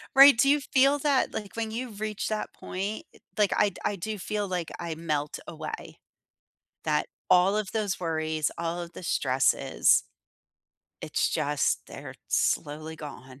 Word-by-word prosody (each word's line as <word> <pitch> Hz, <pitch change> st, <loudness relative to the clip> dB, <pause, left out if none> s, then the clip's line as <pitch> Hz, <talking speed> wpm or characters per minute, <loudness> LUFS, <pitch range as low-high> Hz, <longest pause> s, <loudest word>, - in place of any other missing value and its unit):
Right? 275 Hz, -3 st, +10 dB
Do 275 Hz, +3 st, +4 dB
you 295 Hz, +1 st, +5 dB
feel 275 Hz, +1 st, +3 dB
that? 280 Hz, -2 st, +2 dB
Like, 205 Hz, 0 st, -6 dB
when 225 Hz, -1 st, -2 dB
you 245 Hz, +2 st, -4 dB
reach 210 Hz, 0 st, -4 dB
that 215 Hz, -1 st, -3 dB
point, 200 Hz, +4 st, -4 dB
eh -, -, -19 dB, 0.2 s
like, 210 Hz, -2 st, +3 dB
I 205 Hz, -, +3 dB
I 205 Hz, -, +1 dB
do 210 Hz, +3 st, -4 dB
feel 210 Hz, +1 st, -2 dB
like 180 Hz, -3 st, -3 dB
I 170 Hz, -2 st, -4 dB
melt 150 Hz, -3 st, -2 dB
away. 155 Hz, -1 st, -7 dB, 0.9 s
That -, -, +1 dB, 0.2 s
all 185 Hz, +3 st, +5 dB
of 210 Hz, -3 st, -2 dB
those 210 Hz, -4 st, -1 dB
worries, 160 Hz, -2 st, -1 dB
all 170 Hz, +1 st, -2 dB
of 170 Hz, 0 st, -7 dB
the -, -, -9 dB
stresses. 130 Hz, -5 st, +3 dB, 1.0 s
It's -, -, 0 dB
just 145 Hz, -1 st, 0 dB
they're -, -, -9 dB
slowly 155 Hz, +2 st, 0 dB
gone, 135 Hz, -3 st, -10 dB
185 Hz, 155 wpm, -28 LUFS, 160-215 Hz, 1.0 s, Right